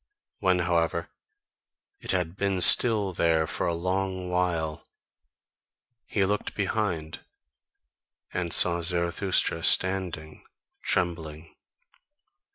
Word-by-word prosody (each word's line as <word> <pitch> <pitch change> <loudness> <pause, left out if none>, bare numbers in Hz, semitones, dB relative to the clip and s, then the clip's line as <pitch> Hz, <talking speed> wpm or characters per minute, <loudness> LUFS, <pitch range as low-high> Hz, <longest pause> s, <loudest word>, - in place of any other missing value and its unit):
When, 95 -2 +2
however, 85 -2 -1 0.9
it - - -13
had 90 -2 -1
been 100 -1 -1
still 105 -2 +6
there 80 -2 +1
for - - -3
a 85 - -1
long 95 +1 -3
while, 85 -4 -2 1.2
he 100 -2 0
looked 105 +1 -3
behind, 95 -6 -3 1.1
and 90 -2 -3
saw 85 +1 +2
Zarathustra 85 0 0
standing 90 -5 +1 0.4
trembling. 80 -3 -3
90 Hz, 90 wpm, -26 LUFS, 85-95 Hz, 1.2 s, still